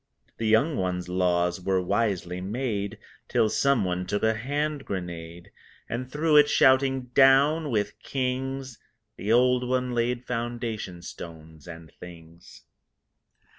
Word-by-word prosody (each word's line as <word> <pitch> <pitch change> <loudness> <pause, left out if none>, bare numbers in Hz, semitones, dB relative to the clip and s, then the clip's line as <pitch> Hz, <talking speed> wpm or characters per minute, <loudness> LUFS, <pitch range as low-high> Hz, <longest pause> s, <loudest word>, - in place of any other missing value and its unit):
The 115 - -1
young 125 +8 +3
one's 90 -1 -2
laws 90 0 +1
were 95 +1 +1
wisely 90 -2 -1
made 105 0 -3 0.3
Till 110 - +2
someone 100 -8 +1
took 105 - -2
a 110 0 +3
hand 145 +5 -2
grenade 85 -2 -7 0.4
And 125 +2 -5
threw 155 +2 +1
it, 145 0 +6
shouting, 130 -1 +3
"Down 140 +4 +5
with 105 -5 -2
Kings!" 130 -1 -3 0.4
The 105 - -3
old 125 +1 +4
one 125 0 0
laid 120 +1 -1
foundation 115 -7 -4
stones 80 -2 -10
and 80 -3 -10
things. 85 -1 -13
110 Hz, 125 wpm, -26 LUFS, 90-130 Hz, 0.4 s, it